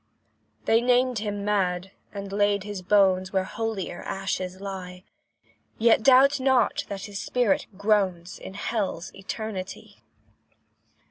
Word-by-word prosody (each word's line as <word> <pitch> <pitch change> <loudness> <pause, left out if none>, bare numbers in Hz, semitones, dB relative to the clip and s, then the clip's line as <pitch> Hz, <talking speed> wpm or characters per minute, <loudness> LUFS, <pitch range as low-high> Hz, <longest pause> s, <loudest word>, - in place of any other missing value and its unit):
They 225 +1 +4
named 250 -1 +2
him 205 -1 -3
mad, 190 -3 0 0.2
and 200 -1 -7
laid 205 -1 +2
his 205 -2 -6
bones 190 -1 +3
Where 190 -1 +1
holier 210 -3 -4
ashes 185 -1 -3
lie; 185 -2 -7 0.7
Yet 225 -1 +4
doubt 270 +3 +6
not 260 -2 +2
that 195 -1 -5
his 205 -1 -6
spirit 245 -6 +1
groans 195 -4 0
In 190 - -9
hell's 200 -5 -3
eternity. 195 -1 -6
200 Hz, 120 wpm, -26 LUFS, 190-220 Hz, 0.7 s, doubt